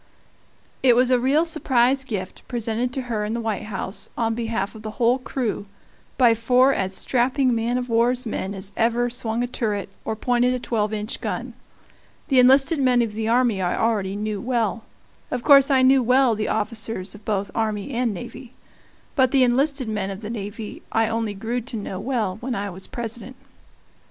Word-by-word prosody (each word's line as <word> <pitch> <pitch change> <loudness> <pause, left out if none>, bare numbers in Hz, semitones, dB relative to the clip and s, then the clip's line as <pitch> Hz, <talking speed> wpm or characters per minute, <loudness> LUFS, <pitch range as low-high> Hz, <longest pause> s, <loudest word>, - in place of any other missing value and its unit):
It 250 -3 +5
was 250 +1 +3
a 250 - +4
real 280 +6 +2
surprise 265 -5 +2
gift, 200 -8 -5
presented 235 0 -2
to 265 - -3
her 225 -4 -2
in 215 +2 -2
the - - -2
White 220 -4 -3
House, 195 -1 -1
on 225 -1 0
behalf 225 -3 -2
of 220 - -11
the 215 - -5
whole 245 +1 +3
crew, 245 -5 -3 0.5
by 240 -3 +6
four 250 +4 +3
as 190 -3 -2
strapping 255 +2 +1
man 230 +2 0
of 250 0 -3
war's 245 +2 +1
men 200 -3 -3
as 195 +1 -5
ever 240 +1 +1
swung 235 -1 -2
a - - -1
turret 210 -6 -2
or 220 - -3
pointed 245 +2 +1
a - - -3
twelve 215 -3 -1
inch 215 +1 -4
gun. - - -4 0.8
The 265 -3 +5
enlisted 270 +5 +5
men 250 -2 +4
of 220 -2 -4
the 220 +1 -3
army 235 -4 +2
I 175 -1 0
already 205 -4 0
knew 210 -1 -3
well 235 -3 -1 0.4
of 250 -1 -3
course 275 -1 +7
I 265 -2 +4
knew 265 +1 +5
well 250 0 +4
the 215 0 -2
officers 215 -3 -2
of 210 0 -13
both 200 -2 -2
army 215 +2 -2
and 240 -2 0
navy. 230 +6 -9 0.6
But 260 -3 +4
the 265 0 +4
enlisted 265 +1 +1
men 210 -3 -2
of 195 +1 -6
the 215 0 -5
navy 210 0 -6
I 225 0 +2
only 225 -2 -2
grew 230 +5 -3
to 235 0 -7
know 195 -3 -5
well 215 -5 -2
when 250 0 -3
I 200 0 -3
was 190 +2 -10
President. 235 +1 -6
230 Hz, 190 wpm, -23 LUFS, 210-250 Hz, 0.8 s, course